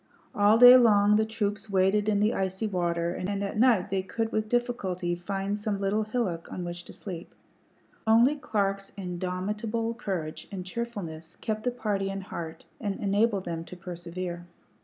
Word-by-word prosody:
All 205 +2 +5
day 245 +1 +11
long 210 -4 +5
the 220 0 +2
troops 210 -1 -2
waded 200 +2 +3
in 205 -1 +2
the 215 +2 +3
icy 190 +2 -1
water, 170 -3 0
and 200 +2 -2
at 200 - -3
night 230 -8 +4
they 195 -1 +1
could 225 +4 -3
with 215 0 -1
difficulty 200 -8 -1
find 195 +3 -3
some 205 -1 -1
little 200 +2 0
hillock 215 -7 -2
on 180 - -4
which 175 0 -6
to - - -10
sleep. 175 -4 -8 0.7
Only 235 +6 +5
Clark's 195 -7 -1
indomitable 200 +5 -2
courage 185 -9 -4
and 185 -2 -5
cheerfulness 185 -7 -5
kept 215 0 -4
the - - +3
party 210 -5 -1
in 195 0 -4
heart 165 -3 -7
and 205 -3 -3
enabled 205 0 +1
them 165 -1 -3
to 180 - -10
persevere. 175 0 -6
200 Hz, 165 wpm, -28 LUFS, 180-220 Hz, 0.7 s, day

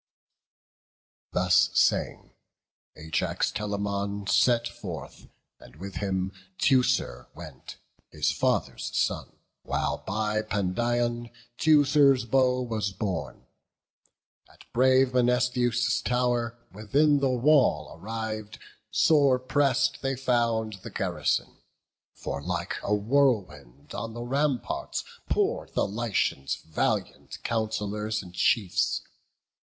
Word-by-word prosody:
Thus 90 +1 +3
saying, - - +1 0.6
Ajax 80 0 -1
Telamon 100 -1 -3
set 120 +3 +3
forth, 80 -11 -8 0.3
And - - -16
with 95 +5 -8
him 95 -2 -1 0.3
Teucer 125 - +2
went, 75 -6 -10 0.3
his - - 0
father's - - -1
son, - - -1 0.3
While - - -2
by 105 +1 -1
Pandion 120 +4 -1 0.3
Teucer's 145 -4 +5
bow 125 +1 +2
was 110 -4 -2
borne. 95 -3 -4 1.1
At - - -18
brave 130 +1 +4
Menestheus' 125 -1 +2
tow'r, 120 -2 0
within 140 +9 +2
the 135 -1 +1
wall, 125 - +3
Arriv'd, 110 +2 -5 0.3
sore 140 -5 +4
press'd 140 +1 +1
they 135 0 -1
found 115 -5 0
the - - -8
garrison; - - -1 0.6
For 70 - -5
like 85 +2 -3
a 105 - +1
whirlwind 100 - 0
on 115 0 -5
the 120 - -5
ramparts 135 +1 -1 0.3
pour'd - - -1
The - - +2
Lycians' 100 - -1
valiant 80 -1 -3
councillors 110 -1 -2
and 90 -1 -12
chiefs. 105 +2 +1
110 Hz, 100 wpm, -27 LUFS, 100-125 Hz, 1.1 s, Teucer's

